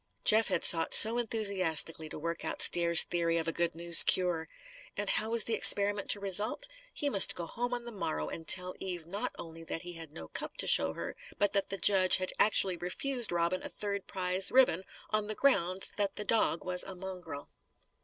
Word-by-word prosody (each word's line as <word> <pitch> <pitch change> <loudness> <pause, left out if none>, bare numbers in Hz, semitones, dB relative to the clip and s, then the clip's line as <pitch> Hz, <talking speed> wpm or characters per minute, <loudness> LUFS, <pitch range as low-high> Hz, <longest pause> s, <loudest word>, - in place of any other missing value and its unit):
Jeff 220 +1 +3
had 185 -4 -2
sought 165 -1 +2
so 230 +2 +5
enthusiastically 185 -8 -1
to - - -10
work 170 +2 -6
out - - -5
Stair's 170 -1 +5
theory 170 -1 -2
of 165 - -4
a - - -1
"good 170 0 -3
news" 170 0 +5
cure! 175 -3 +1 0.5
And - - -3
how 220 - -2
was 230 -1 +2
the 230 - -3
experiment 205 -1 +4
to 205 - +1
result? 205 - -3 0.2
He 290 - -4
must 200 -9 +3
go 170 - -6
home 245 +8 -6
on 240 -1 -5
the 240 - -9
morrow 75 - -5
and 165 -1 -9
tell 180 0 +6
Eve 175 -4 -6
not 195 +5 -5
only 165 0 -11
that 165 - -6
he 175 0 -9
had 165 -3 -11
no 80 - -11
cup - - -8
to - - -2
show 80 0 +3
her, - - -8 0.2
but 205 -1 -1
that 200 -1 -2
the 195 - -5
judge 190 -2 +5
had 185 -1 -4
actually 190 -4 +3
refused 240 +7 -4
Robin 175 +2 -2
a - - -8
third 200 -1 -6
prize 185 0 -1
ribbon, 220 -9 +2 0.3
on 215 -1 -1
the 215 - -5
ground 190 -9 0
that 200 -2 -3
the 210 - -7
dog 220 -7 -1
was 180 0 -3
a 190 - -8
mongrel! 180 -6 -10
185 Hz, 210 wpm, -29 LUFS, 170-210 Hz, 0.5 s, tell